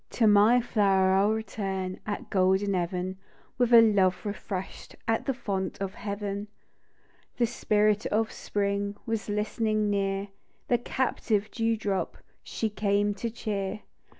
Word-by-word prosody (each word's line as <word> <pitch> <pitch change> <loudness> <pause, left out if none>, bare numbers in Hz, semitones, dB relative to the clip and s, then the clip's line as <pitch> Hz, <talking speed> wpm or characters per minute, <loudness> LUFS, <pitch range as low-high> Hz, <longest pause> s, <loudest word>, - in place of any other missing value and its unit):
" - - -48
To 230 - +5
my 210 +3 +6
flower 195 -5 +3
I'll 195 +2 +4
return 195 -4 -3
At 205 - -4
golden 190 +1 +2
even, 180 +1 -2 0.4
With 245 -1 +3
a 235 -1 +10
love 195 -4 +2
refresh'd 200 -2 -5
At 225 0 0
the 270 - +2
fount 200 -6 -3
of 195 -1 -3
heaven 205 0 -4 0.9
The 240 - +3
Spirit 215 -2 +1
of 220 +1 0
Spring 200 0 -2
Was 225 -3 -3
listening 215 0 0
near; 195 0 -1 0.4
The 240 - +3
captive 225 -4 -1
dew 225 -1 0
drop 200 -3 -2 0.3
She 225 - -2
came 205 -1 +1
to 220 +4 -4
cheer 210 -3 -3
205 Hz, 140 wpm, -28 LUFS, 195-220 Hz, 0.9 s, a